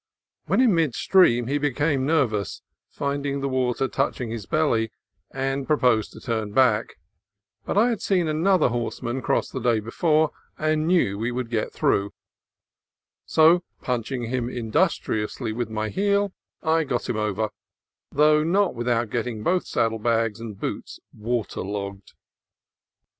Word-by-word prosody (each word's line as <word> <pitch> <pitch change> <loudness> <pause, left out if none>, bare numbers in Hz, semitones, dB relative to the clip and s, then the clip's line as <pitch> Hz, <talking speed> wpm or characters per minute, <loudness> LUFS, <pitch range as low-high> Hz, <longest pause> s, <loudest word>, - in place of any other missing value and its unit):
When - - +3
in 245 -6 +5
mid 160 -7 +1
stream 120 -11 +4
he 140 +4 0
became 145 -1 0
ner 155 -3 +4
vous, 105 -4 -4 0.3
finding 140 0 -2
the 140 - -2
water 130 0 0
touching 130 -3 -2
his 115 -4 -6
belly, 115 -8 +1 0.4
and 135 0 -2
pro 150 - +3
posed 115 -5 +2
to - - -11
turn 110 -3 -3
back; 120 -4 +3 0.7
but - - -2
I 230 +4 +5
had 230 -4 -2
seen 180 -4 +1
another 165 +1 +3
horse 120 0 -3
man 120 +3 -2
cross - - 0
the 130 - -4
day 115 -2 +2
before, 155 +8 +1 0.3
and 155 0 0
knew 160 - +2
we 115 +3 -1
could 125 -1 -4
get 110 -2 -1
through; 100 +1 0 1.1
so, 165 +3 +5 0.2
punching 125 0 -2
him 120 +1 -2
industriously 115 - -1
with 120 0 -3
my 110 0 -2
heel, 200 - +1 0.3
I 160 0 +2
got 130 -5 -2
him 115 - -2
over, 105 0 -1 0.6
though 150 +1 +4
not 190 +5 +2
without 120 -2 -1
getting 115 -3 -3
both 180 +1 +1
saddle 115 -1 0
bags 115 -1 0
and 110 -4 -8
boots - - -5
water 115 0 -3
logged. 100 0 -6
125 Hz, 155 wpm, -24 LUFS, 115-155 Hz, 1.1 s, in